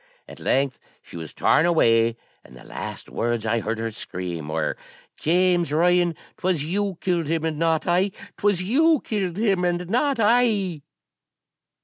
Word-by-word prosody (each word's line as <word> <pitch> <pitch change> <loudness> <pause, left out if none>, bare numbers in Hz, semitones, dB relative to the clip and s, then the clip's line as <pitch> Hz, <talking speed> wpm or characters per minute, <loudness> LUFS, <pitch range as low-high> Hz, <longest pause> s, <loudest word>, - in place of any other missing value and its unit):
At - - -12
length 135 -1 0 0.2
she - - -14
was 80 -2 -7
torn 165 - +3
away; 115 -8 +3 0.3
and 65 - -15
the - - -14
last - - -7
words 120 -1 -2
I 115 +1 +1
heard 110 +1 -3
her 115 0 -3
scream 90 -7 -6
were, 75 - -1 0.4
'James 175 -1 +2
Ryan, 175 +1 +3 0.2
'twas 180 -5 0
you 195 +3 -2
killed 175 -4 0
him, 165 0 -1
and 155 -2 -2
not 165 -1 +1
I 180 +3 +2 0.3
'twas 205 -3 +1
you 300 - +3
killed 195 -5 -3
him, 200 -4 +1
and 175 0 -1
not 265 +2 +1
I.' 210 -7 +2
175 Hz, 155 wpm, -23 LUFS, 120-195 Hz, 0.4 s, torn